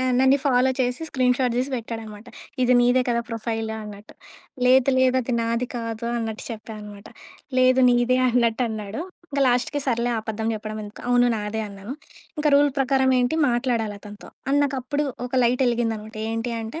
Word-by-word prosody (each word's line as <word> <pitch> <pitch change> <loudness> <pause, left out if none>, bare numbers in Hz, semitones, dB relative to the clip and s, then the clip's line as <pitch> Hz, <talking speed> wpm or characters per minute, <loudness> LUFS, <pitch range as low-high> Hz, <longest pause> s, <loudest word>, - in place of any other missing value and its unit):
ఆహ్, 255 0 +1
నన్నీ 265 +2 +4
ఫాలో 260 -1 +3
చేసి 250 +2 0
స్క్రీన్‌షాట్ 250 -1 +1
తీసి 260 +2 -1
పెట్టాడనమాట. 225 -2 -7 0.4
ఇది 250 - +4
నీదే 245 +1 +4
కదా! 235 0 +1
ప్రొఫైలు 225 -1 -3
అన్నట్టు. 205 0 -11 0.5
లేదు, 260 +1 +5
లేదు 260 0 +3
అది 245 - -3
నాది 230 +2 -1
కాదు 230 0 -4
అన్నట్టు 225 -2 -4
చెప్పా 220 0 -7
అనమాట. 205 -1 -11 0.5
"లేదు 255 0 +5
నీదే" 245 +1 +3
అన్నట్టు 235 0 +2
అన్నాడు. 215 +2 -5 0.3
ఇంకా 280 -1 +1
లాస్ట్‌కి 250 +4 0
సర్లే 240 -1 +1
అబద్ధం 220 0 -3
చెప్పడం 215 0 -6
ఎందుకు, 205 +1 -11
అవును 245 0 +4
నాదే 210 +1 -3
అన్నాను. 200 +4 -8 0.5
ఇంకా 300 - +2
రూల్ 290 0 +4
ప్రకారం 265 0 +2
ఏంటి 245 +5 +1 0.2
మాట్లాడాలి 235 -3 -1
అతనితో. 205 -1 -12 0.2
అండ్ 285 +1 +3
నాకప్పుడు 275 +2 -2 0.2
ఒక 250 - -7
లైట్ 250 +2 +2
ఎలిగిందన్నమాట. 225 -2 -2 0.2
ఏంటి 225 +2 -2
అంటే, 225 +9 -6
240 Hz, 165 wpm, -23 LUFS, 220-255 Hz, 0.5 s, లేదు